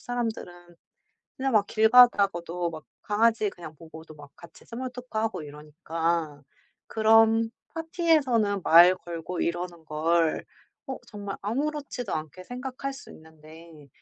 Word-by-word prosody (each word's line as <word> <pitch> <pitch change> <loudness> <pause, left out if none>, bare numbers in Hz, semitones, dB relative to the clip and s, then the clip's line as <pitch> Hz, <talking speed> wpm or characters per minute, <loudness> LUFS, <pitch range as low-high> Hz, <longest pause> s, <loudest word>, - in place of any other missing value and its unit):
사람들은 215 -8 -5 0.6
그냥 270 0 -1
막 210 -2 +3
길 220 +1 +3
가다가도 195 -8 +4
막 155 -1 -9 0.2
강아지 215 0 +2
그냥 170 -4 -11
보고도 160 0 -13
막 145 -1 -14
같이 170 - -16
스몰토크하고 240 -5 -4
이러니까 155 +1 -3 0.5
그런 225 +1 +4 0.2
파티에서는 295 - +1
말 175 +3 +7
걸고 175 0 -6
이러는 170 -1 -3
걸 160 +1 0 0.4
어 265 - -3
정말 205 -3 -6
아무렇지도 275 0 -3
않게 155 +4 -6
생각할 255 +4 -6
수 270 - -12
있는데 160 -1 -15
185 Hz, 280 characters per minute, -26 LUFS, 165-235 Hz, 0.6 s, 말